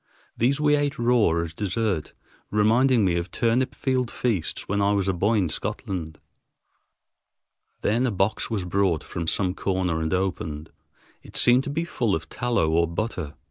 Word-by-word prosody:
These 135 +5 +2
we 150 -1 +4
ate 145 0 -1
raw 120 -4 +3
as 80 -1 -6
dessert, 100 -2 -2 0.4
reminding 115 +2 +3
me 85 -2 +2
of 85 +2 -3
turnip 120 +3 0
field 130 -3 0
feasts 110 -11 -2
when 100 +1 0
I 100 +1 +3
was 100 -2 0
a 95 - +2
boy 100 +6 +1
in 95 -4 +2
Scotland. 80 -1 -5 1.6
Then 120 +5 +2
a - - 0
box 95 +1 0
was 105 -5 -2
brought 90 -3 +1
from 85 -1 -5
some 90 +1 +1
corner 90 -4 -1
and 80 0 -2
opened. 80 -5 -2 0.5
It - - -15
seemed 125 +2 +5
to - - -3
be 165 +4 -1
full 120 - 0
of 80 - -6
tallow 120 -10 0
or 85 +1 +3
butter. 85 -5 -4
100 Hz, 170 wpm, -25 LUFS, 85-120 Hz, 1.6 s, seemed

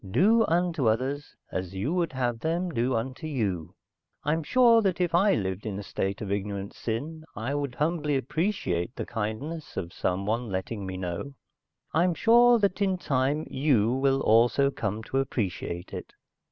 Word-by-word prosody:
Do 215 - +4
unto 165 -7 +2
others 135 +6 -2 0.2
as 95 0 -4
you 105 - -1
would 170 -5 0
have 120 -3 -1
them 170 +5 -1
do 125 -2 0
unto 130 +6 -3
you. 100 - -2 0.5
I'm 155 +3 +1
sure 235 - +5
that 190 -4 0
if 175 -2 0
I 195 +4 +4
lived 95 -2 -2
in 105 -3 -4
a 100 - -5
state 95 0 -3
of 100 -2 -4
ignorant 100 0 -3
sin, 150 +8 -4
I 115 +7 -3
would 140 -3 -2
humbly 150 -2 0
appreciate 130 - -1
the - - -4
kindness 120 +9 -4
of 90 -1 -4
someone 105 +6 -1
letting 95 +2 -3
me 95 0 -4
know. 95 +10 -4 0.6
I'm 170 +2 +3
sure 240 +3 +6
that, 200 -2 0
in 190 -2 +2
time, 140 -1 0
you 130 -6 +2
will 135 +1 +2
also 120 +5 +4
come 105 -3 -3
to 135 - -1
appreciate 95 -9 -3
it." - - -7
130 Hz, 165 wpm, -27 LUFS, 105-165 Hz, 0.6 s, sure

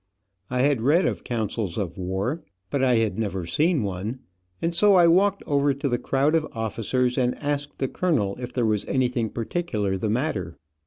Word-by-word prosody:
I 125 0 +1
had 140 -4 +2
read 150 +9 +3
of - - -2
councils 110 -5 -2
of 95 -5 -3
war, 95 - -2 0.3
but 140 -2 0
I 125 -2 +4
had 115 -1 0
never 95 -5 -2
seen 150 - +1
one, 100 +5 -3 0.4
and 165 +1 -1
so 200 +3 +5
I 175 -2 +7
walked 195 +4 +3
over 140 -1 +2
to 140 +1 -2
the 120 -2 0
crowd 140 +3 +1
of 160 -1 +2
officers 115 +3 -1
and 125 -1 +1
asked 145 0 -3
the 135 - -1
colonel 125 - 0
if 125 0 -5
there 125 -2 0
was 105 -2 +1
anything 125 -3 0
particular 110 - -2
the 105 - -1
matter. 105 - -2
125 Hz, 190 wpm, -25 LUFS, 105-145 Hz, 0.4 s, I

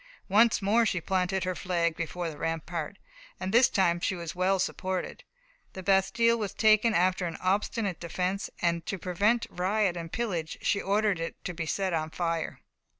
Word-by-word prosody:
Once 220 +1 +4
more 220 +4 +4
she 190 -5 0
planted 185 +1 0
her 185 0 -1
flag 170 -3 0
before 170 +1 -3
the 155 -2 -6
rampart, 165 +2 -3 0.4
and 190 - -3
this 245 +2 +6
time 175 -3 +2
she 190 - -1
was 170 -2 -6
well 185 +1 +2
supported. 185 0 -3 0.5
The 190 - -7
bastile 230 +5 +3
was 200 -2 -3
taken 215 +1 +4
after 180 +1 +2
an 165 - -5
obstinate 195 +1 -1
defence, 180 +3 -2
and 170 -1 +1
to 195 - -2
prevent 200 +7 +1
riot 190 +1 +1
and 165 -1 -6
pillage 180 -9 -3
she 200 - +1
ordered 200 -2 +1
it 165 0 -4
to 180 - -3
be 160 -1 -4
set 190 +2 -1
on 160 -1 -1
fire. 165 -1 -3
185 Hz, 175 wpm, -28 LUFS, 170-200 Hz, 0.5 s, this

